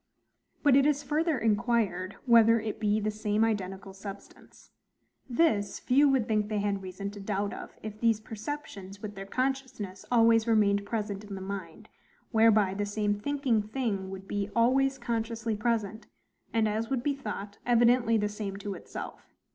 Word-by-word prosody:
But 285 Hz, -3 st, +6 dB
it 275 Hz, +1 st, +5 dB
is 290 Hz, -1 st, +1 dB
further 310 Hz, 0 st, +1 dB
inquired, 215 Hz, -4 st, 0 dB
whether 230 Hz, -2 st, +6 dB
it 215 Hz, -1 st, -4 dB
be 210 Hz, 0 st, +2 dB
the 215 Hz, 0 st, -1 dB
same 210 Hz, 0 st, 0 dB
identical 195 Hz, -3 st, -3 dB
substance. 195 Hz, 0 st, -11 dB, 0.6 s
This 235 Hz, -7 st, +2 dB
few 280 Hz, +3 st, +4 dB
would 265 Hz, -5 st, +2 dB
think 215 Hz, -1 st, +1 dB
they 215 Hz, -, -1 dB
had 200 Hz, -1 st, -1 dB
reason 190 Hz, +2 st, -6 dB
to 205 Hz, -, -10 dB
doubt 200 Hz, 0 st, -2 dB
of, -, -, -9 dB
if 215 Hz, -1 st, -7 dB
these 225 Hz, -2 st, +3 dB
perceptions, 215 Hz, -4 st, -7 dB
with 210 Hz, -1 st, -5 dB
their 195 Hz, -1 st, -8 dB
consciousness, 255 Hz, -6 st, -3 dB
always 230 Hz, -1 st, +5 dB
remained 205 Hz, -2 st, +3 dB
present 210 Hz, -3 st, -3 dB
in 205 Hz, -1 st, -7 dB
the -, -, -6 dB
mind, 190 Hz, -4 st, -7 dB, 0.4 s
whereby 220 Hz, -4 st, +4 dB
the 205 Hz, +1 st, -2 dB
same 205 Hz, 0 st, -1 dB
thinking 270 Hz, -2 st, +1 dB
thing 210 Hz, -4 st, -3 dB
would 190 Hz, 0 st, -8 dB
be 205 Hz, 0 st, -2 dB
always 270 Hz, +3 st, +3 dB
consciously 230 Hz, -1 st, -2 dB
present, 220 Hz, -1 st, -1 dB, 0.4 s
and, 225 Hz, -1 st, +2 dB
as 220 Hz, +2 st, -2 dB
would 260 Hz, -3 st, -1 dB
be 290 Hz, -, +1 dB
thought, 210 Hz, -6 st, -6 dB
evidently 240 Hz, -1 st, +4 dB
the 210 Hz, -1 st, +1 dB
same 205 Hz, -2 st, -5 dB
to 200 Hz, 0 st, -5 dB
itself. 180 Hz, -, -9 dB
215 Hz, 165 wpm, -29 LUFS, 200-235 Hz, 0.6 s, But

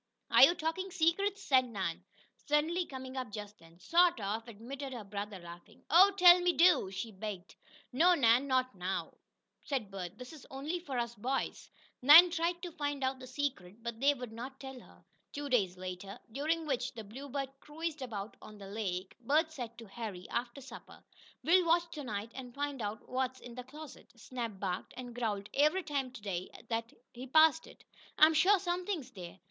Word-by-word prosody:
"Are -, -, +6 dB
you 345 Hz, -, +9 dB
talking 340 Hz, +4 st, -2 dB
secrets?" 370 Hz, +2 st, 0 dB
asked 260 Hz, -1 st, +7 dB
Nan, 195 Hz, -9 st, -4 dB, 0.3 s
suddenly 320 Hz, +4 st, 0 dB
coming 260 Hz, -1 st, -8 dB
up 255 Hz, -5 st, -4 dB
just 210 Hz, 0 st, -8 dB
then. 165 Hz, 0 st, -18 dB
"Sort 340 Hz, -, +3 dB
of," 215 Hz, +3 st, -3 dB
admitted 260 Hz, +5 st, -7 dB
her 235 Hz, -3 st, -6 dB
brother, 200 Hz, 0 st, -6 dB
laughing. 175 Hz, -1 st, -13 dB
"Oh, 365 Hz, +5 st, +8 dB
tell 355 Hz, -1 st, +8 dB
me 355 Hz, 0 st, +3 dB
do!" 345 Hz, -, +5 dB
she 195 Hz, +4 st, -5 dB
begged. 195 Hz, -2 st, -7 dB, 0.4 s
"No, 345 Hz, +7 st, +5 dB
Nan. 245 Hz, -1 st, +4 dB
Not 255 Hz, -1 st, +1 dB
now," 185 Hz, 0 st, -3 dB, 0.5 s
said 250 Hz, -9 st, -3 dB
Bert. 190 Hz, 0 st, -6 dB
"This 250 Hz, +4 st, -10 dB
is 300 Hz, -, -13 dB
only 290 Hz, +6 st, -4 dB
for 280 Hz, -7 st, -5 dB
us 235 Hz, -1 st, -2 dB
boys." 255 Hz, +5 st, -3 dB, 0.3 s
Nan 320 Hz, +7 st, +10 dB
tried 345 Hz, +1 st, -1 dB
to 355 Hz, -, -5 dB
find 290 Hz, -4 st, -3 dB
out 260 Hz, 0 st, -1 dB
the 255 Hz, -, -10 dB
secret, 240 Hz, -7 st, -4 dB
but 235 Hz, -1 st, -5 dB
they 285 Hz, +2 st, +4 dB
would 250 Hz, -3 st, -7 dB
not 255 Hz, +4 st, -8 dB
tell 265 Hz, -1 st, -8 dB
her. -, -, -19 dB, 0.3 s
Two 290 Hz, 0 st, -5 dB
days 195 Hz, -8 st, +1 dB
later, 185 Hz, +2 st, -7 dB
during 315 Hz, +6 st, -1 dB
which 260 Hz, -3 st, -2 dB
the 225 Hz, -, -6 dB
Bluebird 270 Hz, +5 st, -5 dB
cruised 310 Hz, 0 st, -5 dB
about 220 Hz, -5 st, -5 dB
on 215 Hz, -, -12 dB
the 200 Hz, -, -10 dB
lake, 195 Hz, -3 st, -4 dB
Bert 300 Hz, +7 st, +2 dB
said 240 Hz, -6 st, -7 dB
to 230 Hz, -, -10 dB
Harry, 195 Hz, -3 st, -7 dB
after 240 Hz, +3 st, -3 dB
supper: 270 Hz, -, -12 dB, 0.4 s
"We'll 360 Hz, +3 st, +5 dB
watch 340 Hz, +1 st, +3 dB
to 300 Hz, -3 st, -6 dB
night, 215 Hz, -2 st, -4 dB
and 250 Hz, -2 st, -9 dB
find 285 Hz, -2 st, -3 dB
out 210 Hz, +1 st, -5 dB
what's, 260 Hz, 0 st, -2 dB
in 240 Hz, -, -10 dB
that 250 Hz, +1 st, -8 dB
closet. 300 Hz, +1 st, -12 dB
Snap 230 Hz, -4 st, -5 dB
barked 185 Hz, -2 st, -4 dB
and 245 Hz, -1 st, -7 dB
growled 210 Hz, -4 st, -2 dB
every 305 Hz, +7 st, +3 dB
time 280 Hz, -4 st, -2 dB
to 240 Hz, -, -10 dB
day, 185 Hz, -3 st, -3 dB, 0.2 s
that 230 Hz, 0 st, -2 dB, 0.2 s
he 250 Hz, +2 st, -8 dB
passed 315 Hz, +3 st, +5 dB
it. -, -, -16 dB, 0.3 s
I'm 315 Hz, +1 st, +7 dB
sure 370 Hz, +6 st, +5 dB
something's 355 Hz, -6 st, -3 dB
there." 180 Hz, -5 st, -9 dB
255 Hz, 190 wpm, -33 LUFS, 215-310 Hz, 0.5 s, Nan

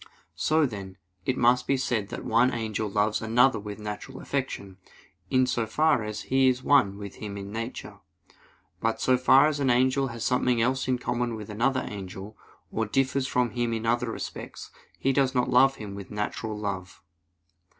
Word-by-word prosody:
So 155 Hz, 0 st, +2 dB
then, 100 Hz, -6 st, -6 dB, 0.3 s
it 130 Hz, -, +1 dB
must 125 Hz, +1 st, +3 dB
be 135 Hz, -, +2 dB
said 115 Hz, -6 st, -1 dB
that -, -, -6 dB
one 120 Hz, +3 st, +3 dB
angel 110 Hz, -3 st, -2 dB
loves 105 Hz, +1 st, +1 dB
another 120 Hz, +3 st, +3 dB
with 105 Hz, 0 st, -7 dB
natural 105 Hz, -1 st, -7 dB
affection, 115 Hz, -9 st, -4 dB, 0.5 s
in 130 Hz, 0 st, +3 dB
so 120 Hz, -3 st, -1 dB
far 150 Hz, 0 st, +2 dB
as 105 Hz, 0 st, -5 dB
he 135 Hz, 0 st, +3 dB
is 125 Hz, 0 st, +1 dB
one 105 Hz, -10 st, +4 dB
with 100 Hz, -1 st, -8 dB
him 100 Hz, -2 st, -6 dB
in 100 Hz, 0 st, -7 dB
nature. 115 Hz, +3 st, -6 dB, 0.8 s
But 115 Hz, 0 st, 0 dB
so 130 Hz, -, +3 dB
far 130 Hz, +2 st, +6 dB
as 150 Hz, -1 st, 0 dB
an 135 Hz, -2 st, +1 dB
angel 130 Hz, +2 st, +3 dB
has 115 Hz, -2 st, -5 dB
something 125 Hz, -1 st, +2 dB
else 130 Hz, +3 st, +1 dB
in 130 Hz, -1 st, +1 dB
common 120 Hz, -1 st, -2 dB
with 105 Hz, -1 st, -8 dB
another 130 Hz, +5 st, 0 dB
angel, 100 Hz, +1 st, -8 dB, 0.4 s
or 110 Hz, -1 st, -1 dB
differs 135 Hz, +3 st, +1 dB
from 125 Hz, -3 st, +1 dB
him 120 Hz, -1 st, -1 dB
in 115 Hz, 0 st, -3 dB
other 120 Hz, 0 st, +1 dB
respects, -, -, -7 dB, 0.3 s
he 135 Hz, -, +1 dB
does 135 Hz, -1 st, +2 dB
not 125 Hz, 0 st, +1 dB
love 135 Hz, +2 st, +5 dB
him 105 Hz, -2 st, -8 dB
with 100 Hz, -1 st, -8 dB
natural 105 Hz, +1 st, -3 dB
love. 95 Hz, -4 st, -5 dB
120 Hz, 180 wpm, -27 LUFS, 105-130 Hz, 0.8 s, far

